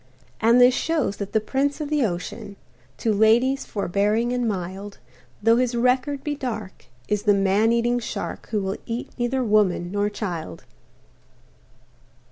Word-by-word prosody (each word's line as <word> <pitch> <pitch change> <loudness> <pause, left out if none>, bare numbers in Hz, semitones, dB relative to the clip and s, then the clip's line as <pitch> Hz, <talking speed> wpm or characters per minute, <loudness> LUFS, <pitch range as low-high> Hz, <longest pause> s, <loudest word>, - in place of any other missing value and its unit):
And 230 +2 +5
this 250 +1 +7
shows 305 -9 -1
that 200 -1 -5
the 220 - +3
prince 275 +7 -1
of 300 -1 -4
the 300 -3 +2
ocean, 185 0 -4 0.4
To 220 - 0
ladies 235 +6 +3
forbearing 210 +5 0
and 245 -1 0
mild, 195 0 -5 0.5
Though 225 +1 +5
his 250 -1 +1
record 255 +3 +1
be 295 - -2
dark, 220 - -6 0.2
is 210 -1 0
the 205 -1 +3
man 200 +3 +3
eating 240 +1 +1
shark 235 - -5
Who 210 -3 -1
will 190 +1 -2
eat 235 +1 -4
neither 250 +2 0
woman 205 -5 +2
nor 205 +1 0
child. 175 - -5
220 Hz, 150 wpm, -23 LUFS, 200-250 Hz, 0.5 s, this